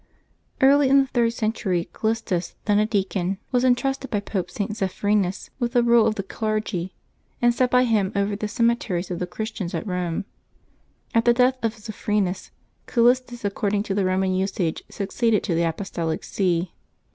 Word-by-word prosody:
/^ARLT 275 +1 +6
in 275 +1 +5
the - - 0
third 240 -3 +1
century, 215 -6 -1
Callistus, 220 -6 -2
then 205 -1 +3
a 215 - +2
deacon, 195 -3 0
VJ^ - - -10
was 250 -1 +2
intrusted 270 +2 +1
by 210 - 0
Pope 190 -3 -3
St. 205 +4 -3
Zephyrinus 195 -1 -1
with 240 -1 -1
the 245 -2 +4
rule 235 -1 +5
of 215 - 0
the 195 - -3
clergy, 210 -3 -3 0.4
and 240 0 +4
set 250 +1 +2
by 250 0 +4
him 215 -6 +1
over 200 +1 0
the 210 +1 -3
cemeteries 230 -6 0
of 175 - -3
the 180 - -2
Christians 210 -1 -4
at - - -3
Eome; 180 -3 -2 0.2
and, - - -32 0.9
at 230 0 +3
the 240 0 +5
death 255 +1 +3
of 225 0 -1
Zephyrinus, 210 -3 -2 0.4
Cal 235 - +2
listus, 245 -2 +2
according 200 0 0
to 205 - -3
the 200 0 +1
Roman 185 0 +1
usage, 185 -3 -1
succeeded 215 +2 0
to 175 - -1
the 165 0 +2
Apostolic 165 -2 -3
See. 180 -2 -1
210 Hz, 180 wpm, -24 LUFS, 190-235 Hz, 0.9 s, ^ARLT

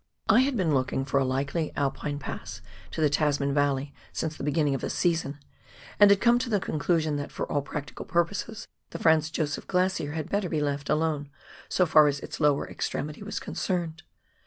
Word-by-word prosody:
I - - +6
had 260 -1 +2
been 170 -6 +1
looking 135 0 0
for 140 0 +1
a - - +2
likely 140 +5 -1
Alpine 145 +1 -1
pass 145 - -7 0.3
to - - -4
the 150 - +4
Tasman 145 -2 +1
Valley 145 -1 +1 0.2
since 160 -1 -3
the - - -7
beginning 150 0 +1
of 135 - -2
the - - -2
season, 165 -5 0 0.6
and 205 -1 +9
had 200 -1 +5
come 240 +2 +4
to 250 -1 -3
the 210 -3 +2
conclusion 155 -2 0
that, 145 - -5
for - - -3
all 145 - +1
practical 145 +1 -6
purposes, 195 +5 -1 0.2
the - - -6
Franz 160 -2 +3
Josef 155 -2 -2
Glacier 180 -5 0
had 160 -2 -3
better 200 -3 0
be 155 - 0
left 145 -1 -2
alone, 150 -2 0 0.4
so 180 - +3
far 155 -2 +6
as 140 -1 0
its - - -7
lower 145 -2 +2
extremity 150 +4 -4
was 210 +1 -4
concerned. 170 -4 -3
155 Hz, 195 wpm, -27 LUFS, 145-175 Hz, 0.6 s, and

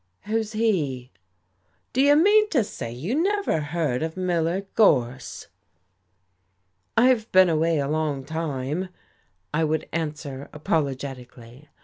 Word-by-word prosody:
"Who's 220 +1 -2
he?" 155 - -1 0.8
"Do 260 - +2
you 285 +1 +6
mean 420 +6 +5
to 265 - +2
say 155 - -7
you 145 - -4
never 400 - +1
heard 150 -4 -2
of 160 +2 -4
Miller 175 0 0
Gorse?" 130 - +1 1.5
"I've 235 -2 +3
been 185 -1 +6
away 165 0 +2
a 140 -1 0
long 150 -3 -1
time," 155 +2 -3 0.6
I 155 +2 +1
would 155 0 -1
answer 150 -4 -4
apologetically. 135 -3 -4
160 Hz, 115 wpm, -24 LUFS, 140-210 Hz, 1.5 s, you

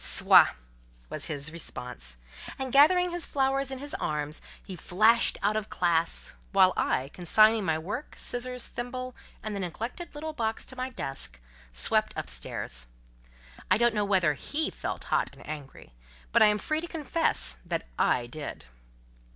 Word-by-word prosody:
"Soit!" - - +6 0.6
was - - -4
his 145 0 -2
response; 125 - -5 0.4
and, 265 -2 -4
gathering 355 +6 +6
his 350 -1 -2
flowers 270 0 +1
in 265 - -4
his 285 +2 -6
arms, 150 0 -2 0.2
he 190 - -8
flashed 215 +7 +3
out 210 +1 +2
of 215 -1 -2
classe; 170 -2 +1 0.2
while 190 -2 +6
I, 130 +2 0
consigning 215 +6 +4
my 160 -2 +1
work, 205 - -5
scissors, 250 0 -1
thimble, 255 +1 -5 0.3
and 215 -1 -3
the - - -3
neglected 230 - -5
little 310 +1 -5
box, 225 -5 -2
to 260 - -8
my 255 +1 -3
desk, 135 - -3 0.3
swept - - +2
up 65 - -3
stairs. - - -2 0.8
I - - +5
don't 235 0 +3
know 210 -1 +1
whether 185 -6 +3
he 300 - -2
felt - - -5
hot - - +2
and - - -14
angry, 145 - -8 0.4
but - - +4
I - - +9
am 210 0 +3
free 310 +8 -1
to 345 - -5
confess 315 - 0
that - - -3
I 120 - +2
did. 145 - -7
210 Hz, 160 wpm, -28 LUFS, 155-260 Hz, 0.8 s, I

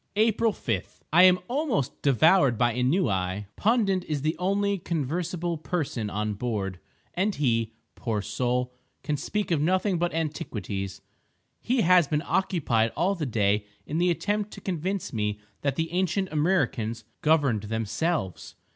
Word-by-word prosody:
April 225 +1 +3
5.—I 115 - 0
am 185 -1 +7
almost 250 - -1
devoured 140 - +4
by 120 +1 +2
ennui. 105 - 0
Pundit 205 -5 +2
is 145 -3 -2
the 155 +1 +1
only 200 +2 +1
conversible 170 +2 -2
person 145 -10 -2
on 105 +1 -2
board; 100 -4 -3 0.3
and 195 +3 0
he, 115 -5 0 0.2
poor 115 -3 -2
soul! 125 +2 -1 0.3
can 150 +1 -1
speak 205 +8 -2
of 155 -4 +2
nothing 185 +2 +1
but 175 0 +1
antiquities. 105 - -4 0.6
He 250 0 +1
has 180 -3 +5
been 150 +1 0
occupied 125 - +1
all 190 +3 +2
the 165 -7 -3
day 105 -2 +1 0.2
in 155 - -2
the 180 +1 +3
attempt 205 +4 0
to - - -8
convince 185 0 -3
me 105 -2 -1 0.2
that 140 -2 0
the 160 +2 -2
ancient 185 +1 0
Amriccans 135 - 0 0.2
governed 145 -9 +3
themselves! 115 - -2
155 Hz, 140 wpm, -27 LUFS, 115-185 Hz, 0.6 s, am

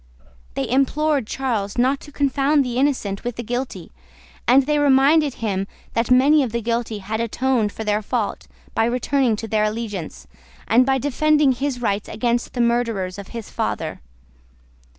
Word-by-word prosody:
They - - -1
implored 275 0 +1
Charles 225 -7 -2
not 260 +3 +2
to 295 - -13
confound 280 0 +2
the 245 -1 -3
innocent 255 -8 0
with 245 -1 -3
the 240 - -5
guilty, 245 +3 -4 0.6
and 260 +2 +5
reminded 290 0 +4
him 195 -3 -2 0.3
that 230 0 0
many 275 +4 +5
of 255 -5 -1
the 235 +1 -2
guilty 230 -1 -1
had 210 +2 -4
atoned 235 -1 0
for 220 - -6
their 210 0 0
fault 220 0 -3 0.3
by 225 - +2
returning 250 0 +1
to 225 +2 -6
their 215 0 +1
allegiance, 210 -6 -5 0.4
and 250 +3 +4
by 270 0 +3
defending 290 +1 +2
his 255 -1 -3
rights 200 -1 -1
against 240 +1 -1
the 245 - 0
murderers 230 -6 0
of 200 - -8
his 230 -3 -8
father. - - -3
245 Hz, 160 wpm, -21 LUFS, 220-270 Hz, 0.6 s, and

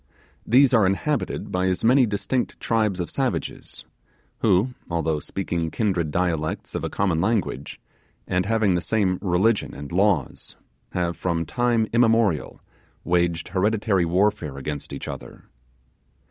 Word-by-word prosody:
These 130 +3 +5
are 110 -5 +5
inhabited 95 +3 -1
by 90 0 0
as 90 -1 -1
many 125 +2 +5
distinct 110 +5 -2
tribes 110 -5 0
of 85 - -2
savages, - - -3 0.5
who, 110 +4 +2 0.2
although 80 -2 0
speaking 85 -1 -3
kindred 90 -6 0
dialects 80 -2 -2
of - - -3
a - - -2
common 90 -5 0
language, 95 - -1 0.5
and 90 +1 0
having 110 -4 +2
the 90 - 0
same 95 0 +1
religion 100 +4 +1
and 70 +1 -8
laws, 95 -6 0 0.4
have 85 -1 -1
from 85 0 -1
time 120 +3 +1
immemorial 115 -8 +2 0.4
waged 85 -2 0
hereditary 100 -1 +1
warfare 90 -4 0
against 70 +1 -5
each - - -6
other. - - -8
95 Hz, 130 wpm, -24 LUFS, 85-110 Hz, 0.5 s, These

